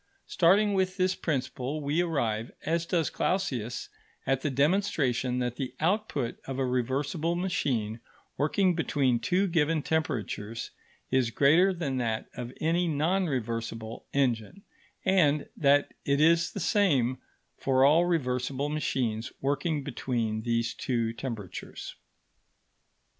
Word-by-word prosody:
Starting 200 +4 +4
with 190 0 0
this 185 0 +2
principle, 135 -2 -2
we 150 +3 0
arrive, 120 -10 -1
as 165 +1 0
does 165 -6 +1
Clausius, 125 - -1 0.4
at 135 -1 +1
the 150 - 0
demonstration 140 -5 +1
that 125 -1 -2
the 130 -2 -4
output 165 - 0
of 135 -1 -5
a 135 - +1
reversible 140 +7 -1
machine 125 - -1 0.4
working 180 +5 +2
between 140 -7 +1
two 180 - +1
given 160 -3 +1
temperatures 115 -8 -2 0.4
is 130 -3 +3
greater 155 +10 +4
than 155 -8 -2
that 115 -3 -1
of 120 -1 -5
any 170 +3 +1
non 170 +5 +1
reversible 115 -3 -4
engine, 135 - 0 0.4
and 155 -7 +3
that 145 -1 +3
it 140 0 +1
is 165 +2 +4
the - - -4
same 140 - +2 0.4
for 130 0 +3
all 160 +5 +5
reversible 135 -4 -1
machines 125 -6 -1
working 145 +2 -1
between 115 -5 -2
these 115 0 0
two 115 -3 -1
temperatures. 115 -6 -6
140 Hz, 125 wpm, -28 LUFS, 125-165 Hz, 0.4 s, all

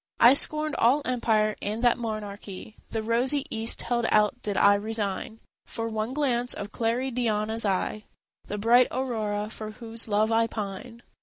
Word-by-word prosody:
I 240 +2 +8
scorned 305 +1 +1
all 270 +5 +4
empire, 220 -4 +1
and 215 +4 -3
that 240 - +5
monarchy 215 -2 -6
The 220 -1 -3
rosy 250 +5 +1
east 225 +1 -1
held 235 -1 0
out 210 +3 +2
did 205 -2 -2
I 200 - +6
resign 215 +1 -2 0.3
For 225 0 -4
one 220 +1 -2
glance 250 -4 0
of 205 +1 -6
Claridiana's 230 -2 -1
eye, 200 +2 -1 0.4
The 205 - -4
bright 240 +4 +5
Aurora 215 -5 -2
for 215 -1 -7
whose 225 +1 -7
love 215 +1 +2
I 225 0 +3
pine. 225 +3 -6
225 Hz, 155 wpm, -27 LUFS, 210-240 Hz, 0.4 s, I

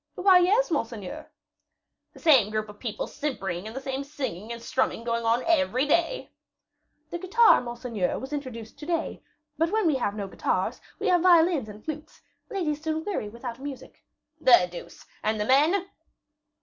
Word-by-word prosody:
"Why, 370 -1 +6
yes, 400 +5 +3
monseigneur." 230 - -4 0.8
"The - - -14
same 265 - +5
group 215 0 -2
of 205 0 -12
people 225 -4 -3
simpering 205 -11 -4
and 220 - -8
the - - -3
same 270 0 -4
singing 260 - -5
and 235 - -5
strumming 260 -1 -1
going 235 -1 -1
on 230 +2 +2
every 280 -5 +2
day?" 340 +11 0 0.8
"The 345 - -3
guitar, 440 +6 +5
monseigneur, 240 -5 -3
was 265 +3 -7
introduced 255 -4 -6
to 300 - -8
day; 335 -1 -2 0.4
but 330 +1 +2
when 435 -1 +1
we 320 - +4
have 205 -5 -1
no 200 -2 -4
guitars, - - -1 0.2
we - - -5
have 355 -2 +4
violins 335 -8 +4
and 210 +1 -12
flutes; 310 0 -7 0.3
ladies 305 -7 -2
soon 315 0 -2
weary 370 - -2
without 235 +2 -7
music." 275 -1 -9 0.4
"The 240 - +6
deuce! 175 - -10 0.2
and 215 0 0
the 210 - 0
men?" 310 - +3
270 Hz, 170 wpm, -26 LUFS, 225-330 Hz, 0.8 s, Why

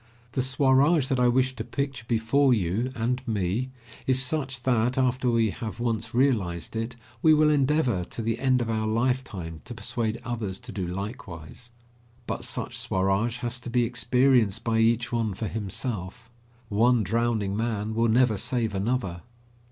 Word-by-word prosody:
The 130 - 0
Swaraj 135 +3 +3
that 130 -2 +1
I 125 - +4
wish 130 +1 +2
to 115 - -4
picture 135 -2 -4
before 120 +4 +3
you 105 +6 -1
and 125 +2 -1
me 105 +3 -1 0.4
is 130 0 +4
such 130 -2 0
that, 125 0 +1
after 130 -1 +1
we 115 -3 +2
have 110 -1 -6
once 115 -1 -2
realised 110 -10 +1
it, 115 +2 -3 0.3
we 155 -1 +6
will 150 0 +4
endeavour 135 - +2
to 115 - -6
the 115 +1 -1
end 130 -2 +2
of 115 - -5
our 110 -1 -1
lifetime 110 -8 -2
to 120 - -7
persuade 110 +1 -2
others 110 -6 -3
to 125 -1 -9
do 95 -5 -3
likewise. 100 +1 -7 0.6
But - - -4
such - - -3
Swaraj 95 +5 0
has 120 0 -2
to 120 - -8
be 120 0 +2
experienced 120 -2 +2
by 115 -1 +1
each 115 +1 +2
one 115 -4 -1
for 110 - -3
himself. 105 +1 -4 0.4
One 115 +2 +3
drowning 110 -1 0
man 110 -1 -2
will 115 +1 +2
never 120 -1 +3
save 115 +1 0
another. 100 -3 -1
115 Hz, 165 wpm, -26 LUFS, 110-125 Hz, 0.6 s, we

